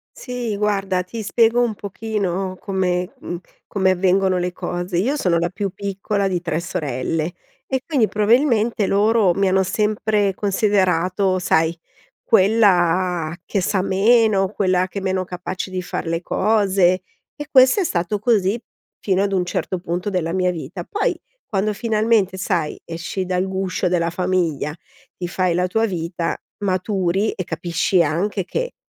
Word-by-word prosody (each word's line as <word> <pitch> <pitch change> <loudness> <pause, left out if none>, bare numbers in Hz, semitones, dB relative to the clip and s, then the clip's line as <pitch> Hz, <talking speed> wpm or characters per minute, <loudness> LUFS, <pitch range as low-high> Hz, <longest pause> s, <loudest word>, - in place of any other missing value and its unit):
Sì, 245 -5 -4
guarda, 195 -3 0
ti 225 +5 -7
spiego 230 +3 +3
un 235 -3 0
pochino 195 -3 -3
come, 180 -2 -1
mhmm, 175 - -5 0.3
come 190 -2 +2
avvengono 185 0 +2
le 180 0 -1
cose. 175 0 -3
Io 250 +11 +1
sono 180 - +1
la 170 +1 0
più 195 +2 -3
piccola 200 +1 -2
di 180 -2 -1
3 165 -2 -2
sorelle 155 -1 -2 0.3
e 265 -1 -1
quindi 265 -9 +2
probabilmente 225 -1 +2
loro 210 -1 +3
mi 195 0 +2
hanno 190 +1 +3
sempre 210 +1 +1
considerato, 190 -2 +1
sai, 165 -2 +1 0.5
quella 185 -6 +3
che 200 - -1
sa 190 +1 +1
meno, 200 0 +3
quella 185 -2 +1
che 200 - -5
è - - -9
meno 190 -1 0
capace 180 +1 -5
di 185 -1 -3
far 175 - -4
le 165 +1 -1
cose 190 -4 +2 0.3
e 295 -1 -7
questo 260 +8 +6
è - - +2
stato 180 - -1
così 215 -1 +2 0.4
fino 190 -1 +1
ad 200 0 0
un 180 -2 +1
certo 185 - -2
punto 180 +3 -3
della 170 -3 -1
mia 185 -1 +1
vita. 170 +2 -6
Poi 410 - -1 0.3
quando 210 +1 -1
finalmente, 215 -3 +1
sai, 180 -5 -1
esci 170 +3 -4
dal 185 +1 0
guscio 190 -1 -1
della 170 -1 +1
famiglia, 175 -5 -1 0.4
ti 175 - -4
fai 185 0 0
la 180 +1 +1
tua 225 +5 +1
vita, 170 -3 -2 0.3
maturi 190 +1 0
e 185 - -4
capisci 170 +2 +1
anche 180 +6 -1
che, - - -3
190 Hz, 155 wpm, -21 LUFS, 180-210 Hz, 0.5 s, questo